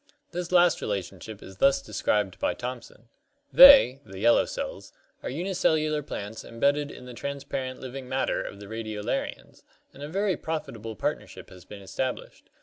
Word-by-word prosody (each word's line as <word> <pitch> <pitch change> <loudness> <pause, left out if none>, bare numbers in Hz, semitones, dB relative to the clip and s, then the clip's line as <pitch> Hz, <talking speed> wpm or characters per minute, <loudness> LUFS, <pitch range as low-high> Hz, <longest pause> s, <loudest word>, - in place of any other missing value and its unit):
This 175 0 -4
last 175 -2 +4
relationship 100 +1 -5
is 95 0 -12
thus 135 +5 +4
described 105 -7 -1
by - - 0
Thomson: 120 -2 -8 0.4
"They 265 - +9
[the 95 -5 -11
'yellow 115 +4 +4
cells'] - - -6 0.3
are - - -5
unicellular 155 -2 0
plants 110 -5 -7
embedded 140 +5 0
in 125 - -11
the 125 - -9
transparent 135 -1 -5
living 130 0 -8
matter 130 0 0
of 100 - -8
the 100 - -9
Radiolarians, 110 -1 -4 0.3
and 140 - -14
a 145 - -6
very 195 +2 0
profitable 115 -9 -5
partnership - - -4
has 90 -1 -14
been 100 0 -11
established. 130 +6 -5
130 Hz, 150 wpm, -27 LUFS, 110-150 Hz, 0.4 s, They